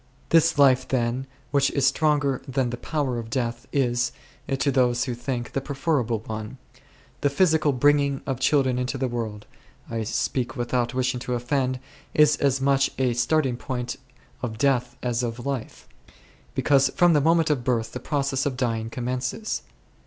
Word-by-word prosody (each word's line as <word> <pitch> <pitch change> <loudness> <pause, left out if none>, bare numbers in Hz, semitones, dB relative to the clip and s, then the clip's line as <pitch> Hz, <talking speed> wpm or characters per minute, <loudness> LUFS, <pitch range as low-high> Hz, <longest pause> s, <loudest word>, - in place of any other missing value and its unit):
This 165 -2 +4
life, 130 -2 +5
then, 125 +1 -1 0.2
which 140 -1 +3
is 140 -2 +1
stronger 145 -1 +2
than 130 -2 0
the 120 - -4
power 135 -4 -2
of 115 -1 -7
death, 120 -1 -2
is, 120 -3 +1 0.4
to 135 +1 +1
those 125 -2 +2
who 130 -3 -2
think, 120 0 -4
the 135 - -1
preferable 135 -5 -1
one. 110 +3 -6 0.6
The 145 - +3
physical 155 0 +3
bringing 140 +1 +2
of 135 -3 -2
children 130 -2 +2
into 125 +2 -2
the 130 0 0
world 110 -4 -4 0.2
— - - -21
I 115 -1 -2
speak 120 +3 -1
without 120 -1 -1
wishing 125 -1 0
to 125 0 -3
offend 130 +1 -1 0.2
— - - -28
is 150 -1 +6
as 135 -1 +1
much 135 0 +3
a 130 -2 +1
start 135 +6 +2
ing 125 -2 -1
point 125 -2 -4 0.4
of 110 -3 -4
death 125 -2 +1
as 120 -1 0
of 120 0 -4
life; 135 -4 -4 0.7
because 135 +1 +3
from 175 -2 +5
the 150 - +4
moment 165 +1 +3
of 135 -5 0
birth 115 -2 0
the 125 - -5
process 140 0 -1
of 130 -3 -3
dying 115 -3 -1
com 120 0 -5
mences. 130 - -2
130 Hz, 175 wpm, -25 LUFS, 120-140 Hz, 0.7 s, is